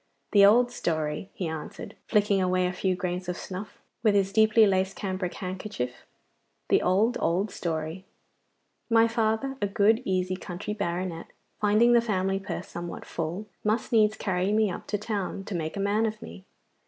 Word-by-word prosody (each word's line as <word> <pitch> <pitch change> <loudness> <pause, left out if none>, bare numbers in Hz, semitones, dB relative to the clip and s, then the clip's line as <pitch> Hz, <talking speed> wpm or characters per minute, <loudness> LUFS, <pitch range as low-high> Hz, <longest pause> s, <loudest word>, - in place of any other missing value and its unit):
'The 200 -1 +6
old 240 +5 +6
story!' 155 -4 -2
he 180 - -3
answered, 160 -1 -7
flicking 205 -2 +3
away 185 0 +2
a 180 - -1
few 185 0 0
grains 180 0 -3
of 180 - -3
snuff 190 +3 -7 0.2
with 215 -3 +3
his 195 -1 +2
deeply 220 +1 +6
laced 190 -1 +1
cambric 185 -3 -3
handkerchief. 185 -10 -5 0.6
'The - - +4
old, 210 +7 +2
old 185 +5 +1
story! 160 +1 -3 0.9
My 230 0 +5
father, 230 +4 0
a 205 - +2
good, 215 +3 +3
easy 185 -2 0
country 185 +2 -5
baronet, 175 -4 -3 0.3
finding 215 +3 +4
the 235 - +6
family 195 -3 0
purse 195 -2 -5
somewhat 175 0 -7
full, 170 +5 -4 0.2
must 215 +5 0
needs 215 -2 +4
carry 185 0 0
me 215 -2 +2
up - - -7
to 210 - -1
town 200 -2 -3
to 205 - -6
make 160 +1 -3
a - - -2
man 205 +3 +2
of 215 0 -5
me. 85 +3 -11
195 Hz, 170 wpm, -27 LUFS, 180-215 Hz, 0.9 s, The